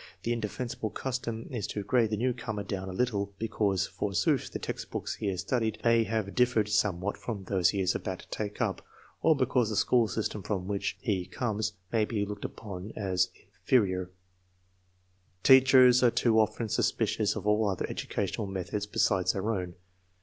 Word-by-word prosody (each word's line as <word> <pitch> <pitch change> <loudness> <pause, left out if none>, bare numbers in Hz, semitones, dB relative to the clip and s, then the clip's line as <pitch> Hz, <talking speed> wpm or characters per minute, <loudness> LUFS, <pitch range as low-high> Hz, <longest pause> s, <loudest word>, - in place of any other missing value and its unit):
The 120 - 0
indefensible 115 0 -3
custom 120 -2 -4
is 115 -6 -3
to 105 - -4
grade 115 +2 +2
the 105 - -1
newcomer 120 -3 -2
down 95 -2 -4
a - - -4
little, 100 -2 -1
because, 100 -4 0
forsooth, 100 -4 0
the - - -3
textbooks - - -5
Uc - - -24
lias 95 -3 -1
studied 110 +2 -1
may 115 -1 +4
have 110 -3 -2
differed 125 -4 +2
somewhat 100 -2 0
from 105 -5 -5
these 95 -1 +2
lie 100 - -1
is 95 0 +2
about 95 - -3
to - - -17
take 105 -1 -4
up, - - -1 0.4
or 160 - +5
because 125 -4 +1
the 110 - -2
school 115 +3 +3
system 105 +1 -3
from 95 -1 -3
\vlnch 100 0 -2
he 95 -6 -1
conies 110 +1 -2 0.2
may 110 -2 +3
be 105 -2 -1
looked 105 0 -6
upon 100 -1 -7
as 95 -2 +1 0.3
inferior* 95 -3 +2 1.3
Teachers 130 -1 +7
an* 120 -2 +4
too 110 -2 +3
often 110 +1 +1
suspicious - - +1
of - - -5
all 105 0 +3
other 95 - -2
educational 105 - -3
methods 95 +2 -3
besides 95 -3 +2
their 100 +3 -1
own. 90 -4 -3
105 Hz, 170 wpm, -29 LUFS, 95-115 Hz, 1.3 s, Teachers